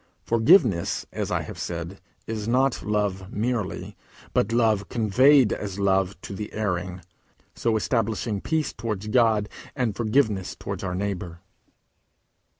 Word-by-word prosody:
Forgiveness, 115 - +3
as - - -2
I - - 0
have - - -9
said, 85 +2 -5 0.2
is 110 -1 -4
not 130 +3 +2
love 100 -3 -1
merely, 110 -2 -2 0.4
but 100 - +1
love 110 -4 +2
conveyed 125 +3 +4
as 100 -2 -5
love 95 -1 +1
to - - -7
the 105 +2 -6
erring, 90 -3 -2 0.5
so 115 -2 0
establishing 110 -2 -1
peace 160 -1 -1
towards 105 -2 -4
God, 110 -3 +3 0.3
and 120 -7 -1
forgiveness 110 -4 +1
towards - - -6
our 90 -2 -2
neighbour. 90 -3 -4
105 Hz, 130 wpm, -25 LUFS, 95-115 Hz, 0.5 s, conveyed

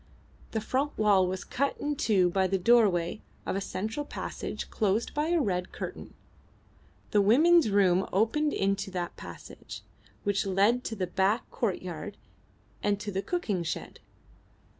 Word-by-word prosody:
The 220 - -2
front 275 +6 -1
wall 200 -4 +4
was 185 +1 -3
cut 280 +2 -1
in 295 0 -1
two 190 -9 +2
by 190 +1 +2
the 195 +1 +1
doorway 195 -3 +3 0.2
of - - -2
a 195 - -1
central 220 +8 -3
passage - - -6
closed 215 +1 0
by 300 +1 0
a 345 0 +2
red 180 - -1
curtain. - - -7 1.0
The 205 - +4
women's 305 +7 +5
room 195 -2 +3
opened 260 +10 +2
into 195 -3 0
that 180 -2 -4
passage, - - -10 0.4
which 205 -1 +1
led 205 +6 +3
to 225 - -3
the 190 -3 -1
back 195 +5 +1
courtyard 185 -2 -3 0.6
and 205 -1 +1
to 210 0 -4
the 190 0 -1
cooking 215 - -1
shed. 165 - -5
205 Hz, 150 wpm, -29 LUFS, 190-235 Hz, 1.0 s, women's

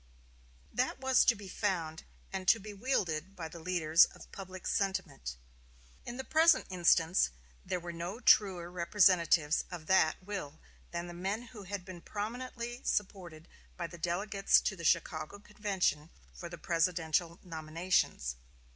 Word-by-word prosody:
That - - 0
was 265 -1 +4
to 235 - +5
be 205 -2 -10
found 170 -5 -2 0.3
and 190 -1 -4
to 225 - +6
be 210 +1 -8
wielded 195 - -1
by 170 -3 -5
the 170 +1 -10
leaders 165 -1 +4
of - - -14
public 185 -1 -9
sentiment 190 - -2 0.7
In 240 - -5
the 265 - -4
present 320 +3 +4
instance 175 - +3 0.3
there 180 - -2
were 175 0 -6
no 175 +6 -5
truer 185 -7 +4
representatives 170 -4 +3
of 170 -3 -7
that 160 -3 +4
will 185 -7 -6 0.3
than 170 0 -4
the 175 - -8
men 195 +6 -3
who 205 -4 -9
had 190 -1 -5
been 180 -2 -9
prominently 240 +4 -5
supported 175 -5 -3 0.3
by 175 - -3
the 170 +1 -9
delegates 195 +4 +2
to 195 - -1
the 170 - -9
Chicago 160 +1 0
convention 200 -7 -1 0.2
for 170 - -8
the 175 - -8
presidential 170 0 0
nominations. 160 - -1
180 Hz, 145 wpm, -32 LUFS, 165-205 Hz, 0.7 s, to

